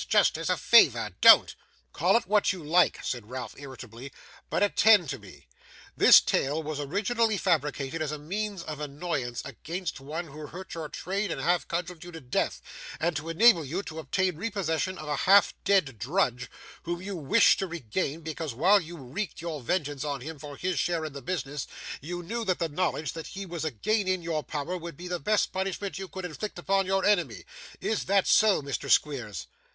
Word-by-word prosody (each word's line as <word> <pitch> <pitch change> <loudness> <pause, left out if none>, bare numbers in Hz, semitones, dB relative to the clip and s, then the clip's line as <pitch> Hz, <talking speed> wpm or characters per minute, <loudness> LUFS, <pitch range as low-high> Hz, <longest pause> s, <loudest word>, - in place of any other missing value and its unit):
Just - - +4
as - - -3
a - - +2
favour, - - +5
don't.' - - +8 0.4
'Call - - +3
it - - -3
what 205 +1 +3
you 185 -4 -7
like,' 170 +4 +3
said 120 -4 -4
Ralph, 130 0 -6
irritably, 130 -2 -10 0.4
'but - - +1
attend 205 -4 +5
to - - -4
me. 90 -9 -15 0.5
This - - +9
tale 150 +4 0
was 150 -1 -4
originally 210 - 0
fabricated 150 -4 -1
as 155 -2 -1
a 150 - -4
means 195 +5 -4
of 155 -3 -6
annoyance 145 -4 -3
against 175 0 -5
one 155 +5 -6
who 150 +1 -9
hurt 185 +4 -9
your 160 -2 -5
trade 195 +6 -3
and - - -3
half 175 0 +1
cudgelled 175 -1 -4
you 175 - -9
to 165 - -7
death, 125 -5 -2 0.4
and 170 +1 0
to 150 +3 -4
enable 185 0 +5
you 165 +8 -3
to 160 -3 -7
obtain 180 +3 -1
repossession 185 -3 -2
of 155 - -8
a 150 - 0
half 200 +1 +7
dead 150 - +2
drudge, 125 - 0 0.3
whom 175 0 -4
you 195 +2 -6
wished 170 +7 +4
to 195 - -1
regain, 160 - -3
because, 160 -4 -5
while 190 - +5
you 170 +1 -9
wreaked 155 +9 -5
your 160 -3 -5
vengeance 145 -1 -2
on 140 -3 -3
him 155 +2 -7
for 145 -1 -9
his 180 -2 -1
share 165 0 0
in 155 - -6
the 140 - -7
business, 145 -2 -4 0.3
you 175 +4 -5
knew 230 +7 -3
that 185 -4 0
the 165 -2 -2
knowledge 155 -2 -1
that 165 -1 -7
he 195 0 -7
was 170 -3 -5
again 185 - 0
in 185 -2 0
your 165 -2 -1
power 150 +4 -4
would 170 -4 -7
be 180 - -8
the 180 -1 -3
best 215 +2 +1
punishment 190 +1 -3
you 190 - -5
could 190 0 -7
inflict 180 +5 -6
upon 195 +2 +1
your 195 0 +1
enemy. 205 -4 +1 0.4
Is 220 - -1
that 195 0 +3
so, 210 -8 +4
Mr. 140 -1 -4
Squeers? 110 - +1
165 Hz, 200 wpm, -28 LUFS, 145-190 Hz, 0.5 s, This